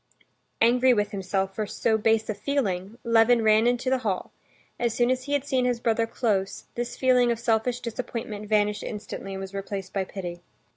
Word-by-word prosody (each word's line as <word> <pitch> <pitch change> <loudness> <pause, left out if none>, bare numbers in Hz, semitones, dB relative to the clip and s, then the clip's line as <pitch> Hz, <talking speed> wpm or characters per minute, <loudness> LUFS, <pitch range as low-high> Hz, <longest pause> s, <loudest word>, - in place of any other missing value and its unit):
Angry 250 +2 +5
with 205 -1 0
himself 195 0 -2
for 215 +1 -3
so 220 +2 +1
base 220 0 +2
a 215 - -1
feeling, 205 -4 -2
Levin 230 0 +4
ran 220 +1 +5
into 245 +1 +1
the 265 - +2
hall; 205 -7 -2 0.5
as 235 -2 0
soon 240 +1 +3
as 255 0 -1
he 285 - -3
had 285 -1 +1
seen 260 -3 +1
his 245 -1 +1
brother 230 -1 +1
close, 200 -5 -1
this 240 0 -4
feeling 250 -2 +4
of 235 - 0
selfish 235 +1 +1
disappointment 225 -3 -5
vanished 210 -1 +2
instantly 205 -2 -6
and 190 - -5
was 195 0 -7
replaced 195 -1 -5
by 195 - 0
pity. 175 -2 -7
225 Hz, 190 wpm, -26 LUFS, 200-245 Hz, 0.5 s, Angry